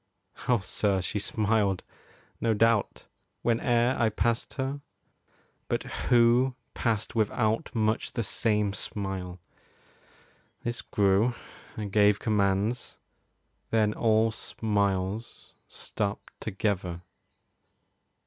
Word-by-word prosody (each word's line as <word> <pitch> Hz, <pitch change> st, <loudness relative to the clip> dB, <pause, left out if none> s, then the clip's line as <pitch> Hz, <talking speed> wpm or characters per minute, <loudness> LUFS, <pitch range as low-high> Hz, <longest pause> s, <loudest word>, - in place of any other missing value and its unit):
Oh 125 Hz, -, +5 dB
sir, 100 Hz, 0 st, 0 dB
she 95 Hz, +3 st, -2 dB
smiled, 105 Hz, -2 st, +1 dB, 0.6 s
no 115 Hz, -1 st, +2 dB
doubt, 115 Hz, -1 st, +2 dB, 0.4 s
Whene'er 120 Hz, +1 st, +2 dB
I 115 Hz, -2 st, +4 dB
passed 115 Hz, +2 st, -1 dB
her; 135 Hz, +1 st, -3 dB, 0.9 s
but -, -, -1 dB
who 120 Hz, +2 st, +3 dB, 0.2 s
passed 110 Hz, -3 st, -1 dB
without 110 Hz, 0 st, +1 dB
Much 110 Hz, 0 st, 0 dB
the 115 Hz, -, -1 dB
same 105 Hz, -1 st, +1 dB
smile? 95 Hz, -3 st, -4 dB, 1.2 s
This 120 Hz, 0 st, -2 dB
grew; 100 Hz, +4 st, +2 dB, 0.4 s
I 105 Hz, -, -3 dB
gave 105 Hz, 0 st, +4 dB
commands; 105 Hz, +2 st, 0 dB, 0.7 s
Then 110 Hz, -2 st, +2 dB
all 110 Hz, 0 st, +3 dB
smiles 100 Hz, -1 st, -2 dB, 0.2 s
stopped 100 Hz, 0 st, -4 dB
together. 95 Hz, -4 st, -2 dB
110 Hz, 90 wpm, -28 LUFS, 100-115 Hz, 1.2 s, Oh